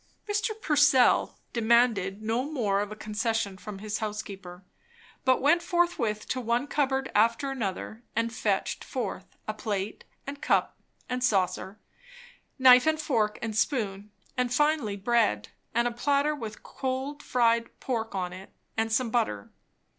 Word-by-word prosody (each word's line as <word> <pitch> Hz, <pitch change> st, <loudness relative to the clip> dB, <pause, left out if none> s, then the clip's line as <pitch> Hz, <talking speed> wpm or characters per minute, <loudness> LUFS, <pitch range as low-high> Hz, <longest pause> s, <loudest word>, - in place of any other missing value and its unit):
Mr. 420 Hz, +1 st, -1 dB
Purcell 290 Hz, -, +4 dB, 0.2 s
demanded 220 Hz, -4 st, +2 dB
no 225 Hz, +3 st, 0 dB
more 210 Hz, -9 st, +1 dB
of 205 Hz, 0 st, -3 dB
a -, -, -5 dB
concession 215 Hz, -1 st, -2 dB
from 200 Hz, +2 st, -8 dB
his 210 Hz, +1 st, -4 dB
housekeeper, 195 Hz, -4 st, -6 dB, 0.6 s
but 260 Hz, 0 st, +3 dB
went 340 Hz, +5 st, +5 dB
forthwith 340 Hz, -, 0 dB
to 255 Hz, -, -2 dB
one 235 Hz, +3 st, 0 dB
cupboard 270 Hz, -2 st, 0 dB
after 230 Hz, +6 st, +2 dB
another 220 Hz, -2 st, -4 dB
and 230 Hz, +1 st, 0 dB
fetched 205 Hz, -3 st, -1 dB
forth -, -, -5 dB
a -, -, -1 dB
plate 205 Hz, -2 st, -3 dB, 0.2 s
and 280 Hz, +1 st, -7 dB
cup -, -, +1 dB, 0.3 s
and 250 Hz, 0 st, -2 dB
saucer, 190 Hz, -2 st, 0 dB, 0.8 s
knife 255 Hz, +1 st, +7 dB
and 315 Hz, 0 st, +2 dB
fork 225 Hz, -9 st, 0 dB
and 220 Hz, -2 st, -3 dB
spoon, 210 Hz, -4 st, -1 dB, 0.3 s
and 250 Hz, -1 st, 0 dB
finally 295 Hz, -7 st, +1 dB
bread, 195 Hz, -, +1 dB, 0.3 s
a 240 Hz, +1 st, +2 dB
platter 280 Hz, +5 st, +1 dB
with 225 Hz, -7 st, -7 dB
cold 265 Hz, +2 st, -4 dB
fried 235 Hz, -3 st, +2 dB
pork 225 Hz, -5 st, -3 dB
on 180 Hz, -2 st, -2 dB
it, 185 Hz, +1 st, -11 dB, 0.2 s
and 225 Hz, 0 st, 0 dB
some 230 Hz, +1 st, +1 dB
butter. 105 Hz, -, -1 dB
230 Hz, 140 wpm, -28 LUFS, 210-265 Hz, 0.8 s, knife